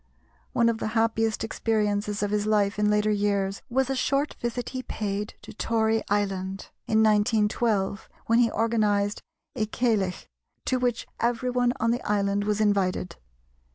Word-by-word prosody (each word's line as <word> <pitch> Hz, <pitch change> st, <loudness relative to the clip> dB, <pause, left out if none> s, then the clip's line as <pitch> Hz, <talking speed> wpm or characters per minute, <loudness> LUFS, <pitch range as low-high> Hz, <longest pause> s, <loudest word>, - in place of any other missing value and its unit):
One 235 Hz, -, +3 dB
of 230 Hz, -1 st, +1 dB
the -, -, -2 dB
happiest 225 Hz, 0 st, +1 dB
experiences 210 Hz, -2 st, -1 dB
of 205 Hz, -, -1 dB
his 210 Hz, 0 st, 0 dB
life 205 Hz, -1 st, +2 dB
in 210 Hz, 0 st, +3 dB
later 210 Hz, 0 st, +2 dB
years 200 Hz, -1 st, 0 dB
was 265 Hz, +1 st, +1 dB
a 270 Hz, -, -1 dB
short 275 Hz, +3 st, 0 dB
visit 240 Hz, +1 st, -3 dB
he 255 Hz, -, -4 dB
paid 210 Hz, -3 st, -4 dB
to -, -, -10 dB
Tory 225 Hz, 0 st, +1 dB
Island 195 Hz, -1 st, -1 dB, 0.2 s
in 220 Hz, 0 st, +3 dB
1912, 210 Hz, -1 st, +1 dB, 0.2 s
when 230 Hz, +1 st, +3 dB
he 235 Hz, -1 st, +4 dB
organised 210 Hz, -3 st, +1 dB, 0.3 s
a 220 Hz, -3 st, -1 dB
Ceilidh, 210 Hz, -5 st, 0 dB, 0.4 s
to 255 Hz, -, +1 dB
which 245 Hz, -2 st, 0 dB
everyone 245 Hz, +1 st, +1 dB
on 230 Hz, +1 st, +2 dB
the 245 Hz, +1 st, -1 dB
island 200 Hz, 0 st, 0 dB
was 210 Hz, 0 st, 0 dB
invited. 195 Hz, -4 st, +1 dB
215 Hz, 155 wpm, -26 LUFS, 205-230 Hz, 0.4 s, he